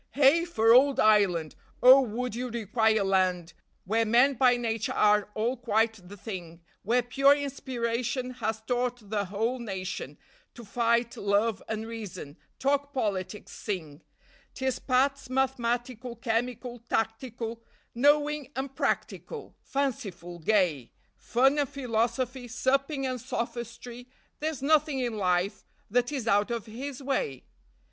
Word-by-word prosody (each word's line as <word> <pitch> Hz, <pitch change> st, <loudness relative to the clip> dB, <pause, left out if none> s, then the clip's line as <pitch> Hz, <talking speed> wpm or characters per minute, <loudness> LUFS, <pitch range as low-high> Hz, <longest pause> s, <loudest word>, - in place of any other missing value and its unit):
Heigh 290 Hz, +5 st, +5 dB
for 225 Hz, -9 st, +4 dB
ould 270 Hz, +2 st, +5 dB
Ireland! 195 Hz, -7 st, +3 dB, 0.3 s
Oh, 260 Hz, +2 st, +9 dB
would 250 Hz, 0 st, -3 dB
you 250 Hz, +2 st, -3 dB
require 220 Hz, -1 st, +1 dB
a -, -, +2 dB
land 185 Hz, -3 st, +1 dB, 0.3 s
Where 225 Hz, +4 st, +2 dB
men 240 Hz, +5 st, +4 dB
by 250 Hz, -1 st, +4 dB
nature 225 Hz, -2 st, -2 dB
are 210 Hz, -1 st, +3 dB
all 235 Hz, +4 st, 0 dB
quite 225 Hz, -4 st, 0 dB
the 205 Hz, -, -10 dB
thing, 175 Hz, -5 st, -8 dB, 0.2 s
Where 240 Hz, +4 st, +2 dB
pure 275 Hz, +3 st, +4 dB
inspiration 255 Hz, -2 st, -3 dB
has 220 Hz, -3 st, -3 dB
taught 245 Hz, -2 st, -2 dB
the 205 Hz, -2 st, 0 dB
whole 225 Hz, +6 st, -2 dB
nation 190 Hz, -, -5 dB, 0.4 s
To 235 Hz, 0 st, -10 dB
fight, 235 Hz, +2 st, +1 dB
love, 200 Hz, +1 st, +1 dB
and 220 Hz, 0 st, -3 dB
reason, 210 Hz, -9 st, -7 dB, 0.2 s
talk 285 Hz, +1 st, 0 dB
politics, 205 Hz, -4 st, -3 dB
sing; 165 Hz, -7 st, -5 dB, 0.5 s
'Tis 265 Hz, -1 st, -1 dB
Pat's 270 Hz, +1 st, +1 dB
mathematical, 250 Hz, -2 st, -1 dB
chemical, 240 Hz, +1 st, -2 dB
tactical, 230 Hz, 0 st, -2 dB, 0.3 s
Knowing 290 Hz, +2 st, +2 dB
and 270 Hz, +1 st, -4 dB
practical, 445 Hz, -, -3 dB
fanciful, 200 Hz, -11 st, -3 dB
gay, 165 Hz, -, +1 dB, 0.2 s
Fun 270 Hz, +5 st, +2 dB
and 285 Hz, -3 st, 0 dB
philosophy, 245 Hz, 0 st, -1 dB
supping 270 Hz, +4 st, 0 dB
and 255 Hz, -2 st, -3 dB
sophistry, 240 Hz, 0 st, -5 dB, 0.3 s
There's 305 Hz, -3 st, -3 dB
nothing 305 Hz, -1 st, +3 dB
in 240 Hz, -4 st, -2 dB
life 185 Hz, +2 st, 0 dB, 0.3 s
that 245 Hz, +3 st, +2 dB
is 265 Hz, -6 st, -3 dB
out 205 Hz, 0 st, +3 dB
of 235 Hz, -3 st, -3 dB
his 260 Hz, +5 st, -7 dB
way. 255 Hz, -, -2 dB
235 Hz, 130 wpm, -28 LUFS, 210-260 Hz, 0.5 s, Oh